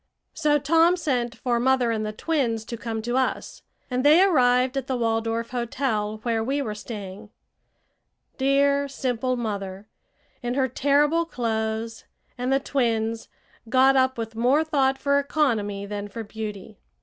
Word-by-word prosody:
So 300 -2 +2
Tom 330 +5 +3
sent 245 -7 -1
for 240 -2 -1
mother 255 -1 +2
and 220 -1 -1
the 215 - -3
twins 230 -3 -1
to 235 - -5
come 225 -1 -5
to 240 +2 -1
us, 260 -1 -2 0.3
and 250 0 -1
they 310 +6 +7
arrived 255 -7 +3
at 270 -1 -2
the 260 - -1
Waldorf 230 0 -1
Hotel, 235 -3 -2
where 230 -2 0
we 275 +5 -1
were 230 -7 -3
staying. 210 -1 -8 1.1
Dear, 280 +1 +2
simple 255 -2 -2
mother, 200 -4 -4 0.6
in 245 0 -2
her 265 -1 +2
terrible 290 +6 +2
clothes, 225 -3 -3 0.3
and 250 +1 -2
the 270 - +3
twins, 230 -5 -1 0.4
got 265 +2 +5
up 260 -1 +2
with 225 -1 -5
more 255 +7 +3
thought 275 -4 +1
for 280 +1 +2
economy 225 -9 0
than 205 0 -5
for 225 +3 -7
beauty! 210 - -7
245 Hz, 150 wpm, -24 LUFS, 225-275 Hz, 1.1 s, they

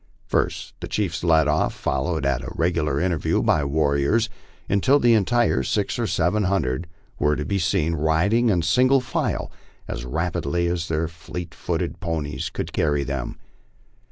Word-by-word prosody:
First - - -1
the - - -5
chiefs - - -2
led 80 -3 +4
off, 75 +1 +1
followed 70 +2 -1
at 70 - +1 0.2
regular 80 -4 +1
intervals 85 -2 0
by - - +4
the 70 - -1
warriors, 75 +9 +2 0.4
until 130 +9 +3
the 120 -4 +4
entire 115 - +2
six 65 - -1
or - - 0
seven 100 +5 +1
hundred 85 -5 0 0.3
were 75 0 +2
to 75 - -3
be 100 -1 0
seen 85 -1 +1
riding 85 +10 +2
in 90 -5 +2
single 130 +11 +4
file 125 - -2 0.4
as - - -5
rapidly 85 +3 -1
as 85 -1 -1
their 80 0 0
fleet 85 +1 -8
footed - - -3
ponies 80 -4 -3
could - - -5
carry 75 -2 +1
them. 70 -2 -4
80 Hz, 155 wpm, -23 LUFS, 75-95 Hz, 0.4 s, led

